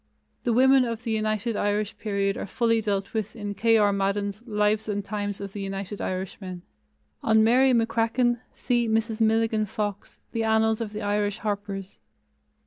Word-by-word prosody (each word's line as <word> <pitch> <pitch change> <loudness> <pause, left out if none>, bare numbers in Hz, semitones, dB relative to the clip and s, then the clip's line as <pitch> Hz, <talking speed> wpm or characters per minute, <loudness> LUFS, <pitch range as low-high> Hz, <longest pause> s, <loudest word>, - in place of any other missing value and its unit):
The 240 - +2
women 260 +2 +5
of 230 -1 -3
the 230 - -2
United 215 +1 -1
Irish 205 +1 0
period 200 -2 0
are - - -5
fully 230 +2 +1
dealt 200 -2 -2
with 220 -1 -3
in 205 -2 -4
K. 225 +3 +3
R. 205 -2 +4
Madden's 200 +1 -1
Lives 210 0 +1
and 205 -1 -2
Times 205 -1 -3
of 200 -1 -7
the 205 - -5
United 195 +1 -5
Irishmen. 185 -1 -5 0.6
On 220 0 +4
Mary 255 +4 +5
McCracken, 230 +1 +2
see 240 -2 0
Mrs. 225 0 0
Milligan 220 -1 +2
Fox, 205 0 -4
The 230 -1 -1
Annals 220 0 +2
of 220 -2 -3
the 210 0 -5
Irish 205 0 0
Harpers. 200 -2 -4
215 Hz, 165 wpm, -26 LUFS, 205-225 Hz, 0.6 s, women